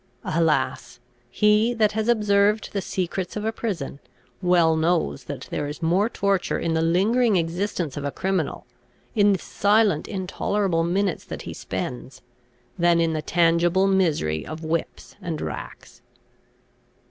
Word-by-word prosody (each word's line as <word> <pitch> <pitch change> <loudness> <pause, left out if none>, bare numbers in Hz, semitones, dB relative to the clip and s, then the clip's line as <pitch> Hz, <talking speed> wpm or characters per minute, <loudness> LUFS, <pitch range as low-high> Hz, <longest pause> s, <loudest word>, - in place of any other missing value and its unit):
Alas! 155 -5 0 0.3
he 210 - +3
that 215 -2 +3
has 220 +1 -2
observed 210 -2 +2
the 200 - -1
secrets 185 0 -3
of 210 0 -3
a 220 - +1
prison, 185 -12 -4 0.4
well 175 -3 +4
knows 160 - 0
that - - -7
there 145 - -2
is 145 +3 -7
more 185 +7 +2
torture 200 -4 0
in 165 - -1
the 160 - +1
lingering 205 +7 +3
existence 170 -2 -1
of 145 - -5
a 145 - -1
criminal, 185 0 -2 0.5
in 205 -1 +4
the 195 - +2
silent 205 -4 +2
intolerable 190 -2 -1
minutes 185 +1 0
that - - -7
he - - -6
spends, 125 +7 -6 0.6
than 170 0 +4
in 165 -1 +1
the 155 - -2
tangible 170 +3 +2
misery 160 - +1
of 155 +1 -8
whips 160 +1 -3
and 165 -3 -4
racks! - - -7
180 Hz, 145 wpm, -24 LUFS, 160-205 Hz, 0.6 s, well